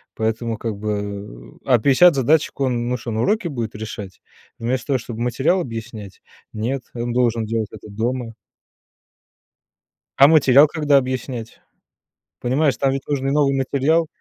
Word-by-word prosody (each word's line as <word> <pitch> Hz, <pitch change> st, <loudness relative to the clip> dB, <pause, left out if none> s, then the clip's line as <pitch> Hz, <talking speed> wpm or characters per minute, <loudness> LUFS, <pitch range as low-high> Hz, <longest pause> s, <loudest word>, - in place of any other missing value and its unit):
Поэтому, 115 Hz, +1 st, -2 dB
как 110 Hz, -2 st, -4 dB
бы, 100 Hz, -, -5 dB
э, -, -, -33 dB
а 125 Hz, -3 st, +4 dB
50 145 Hz, +9 st, +5 dB
задачек 145 Hz, +3 st, +1 dB
он, 120 Hz, -3 st, 0 dB
ну 125 Hz, -, 0 dB
шо, 120 Hz, 0 st, -7 dB
на 110 Hz, 0 st, -1 dB
уроке 210 Hz, -3 st, 0 dB
будет 115 Hz, -6 st, -4 dB
решать 105 Hz, -3 st, -8 dB, 0.4 s
вместо 120 Hz, +1 st, -2 dB
того, 135 Hz, -2 st, +1 dB
чтоб 115 Hz, -1 st, -8 dB
материал 125 Hz, +10 st, +1 dB
объяснять? 115 Hz, -, -8 dB, 0.3 s
Нет, 120 Hz, +5 st, -3 dB
он 120 Hz, 0 st, -3 dB
должен 120 Hz, -2 st, +1 dB
делать 110 Hz, -1 st, -2 dB
это 110 Hz, 0 st, -11 dB
дома. 115 Hz, +2 st, -3 dB, 1.8 s
А 140 Hz, -, +9 dB
материал 145 Hz, -2 st, +6 dB
когда 150 Hz, -2 st, +2 dB
объяснять? 130 Hz, -3 st, -3 dB, 0.8 s
Понимаешь, 135 Hz, +1 st, +1 dB
там 135 Hz, +2 st, +1 dB
ведь 135 Hz, 0 st, -4 dB
нужен 140 Hz, -2 st, -1 dB
и 135 Hz, -, +1 dB
новый 140 Hz, -2 st, +2 dB
материал. 140 Hz, +5 st, +1 dB
125 Hz, 150 wpm, -21 LUFS, 110-135 Hz, 1.8 s, А